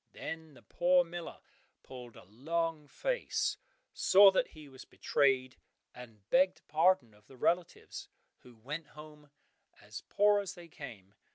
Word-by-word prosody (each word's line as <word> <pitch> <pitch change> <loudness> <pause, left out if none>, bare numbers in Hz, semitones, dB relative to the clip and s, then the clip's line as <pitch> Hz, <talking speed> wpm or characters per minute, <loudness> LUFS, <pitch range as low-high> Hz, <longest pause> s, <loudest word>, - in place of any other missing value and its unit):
Then 160 -2 -7
the 120 - -17
poor 180 +1 +3
miller 170 0 -8 0.4
pulled 125 -3 -11
a - - -13
long 155 - -3
face, - - -2 0.4
saw 195 +1 +7
that 220 +6 +1
he 155 -2 -14
was 130 -1 -12
betrayed, 130 -2 0 0.4
and 115 -5 -14
begged 185 +1 +3
pardon 155 - +2
of 105 0 -24
the 130 - -16
relatives, 170 +6 -2 0.3
who 125 -1 -17
went 145 +8 -7
home 150 -1 -13 0.5
as - - -9
poor 205 0 +4
as 200 -3 -5
they 170 -1 -13
came. 110 -11 -11
150 Hz, 145 wpm, -32 LUFS, 125-175 Hz, 0.5 s, saw